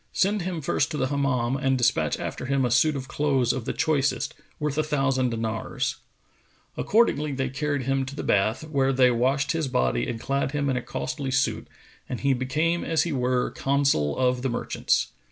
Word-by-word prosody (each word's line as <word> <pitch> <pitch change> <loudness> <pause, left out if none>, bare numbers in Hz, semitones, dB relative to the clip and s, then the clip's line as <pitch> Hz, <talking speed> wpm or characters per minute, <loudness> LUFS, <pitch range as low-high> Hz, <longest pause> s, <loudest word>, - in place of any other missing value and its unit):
Send 200 +2 +1
him 175 -2 -3
first 145 +1 0
to 155 - -4
the 130 -2 0
Hammam 135 -3 0
and 135 -1 +1
despatch 115 - +1
after - - -5
him 135 -1 +1
a 120 - -1
suit 145 +6 +3
of 130 -1 -5
clothes 135 -5 +1
of 125 -3 -4
the - - -1
choicest, 145 -4 0 0.3
worth 150 -1 -1
a - - +3
thousand 135 -4 +1
dinars."[FN#460] 115 -1 -3 0.8
Accordingly 175 -9 +2
they 135 -1 -1
carried 145 +1 -2
him 135 +1 0
to 140 - -7
the - - -4
bath, 110 +6 +1
where 135 -3 +1
they 130 -1 +5
washed 135 +4 +1
his 160 -3 -1
body 60 - 0
and 115 - -4
clad 140 +2 -1
him 140 -2 0
in - - 0
a 125 - -1
costly 135 +2 -4
suit, 135 +1 0 0.4
and 125 - -4
he 140 -1 +3
became 155 +7 0
as 165 -1 +1
he 170 - -2
were 125 -1 0
Consul 135 - +1
of 125 -1 +1
the 135 - -1
Merchants. 120 - 0
135 Hz, 195 wpm, -25 LUFS, 125-145 Hz, 0.8 s, they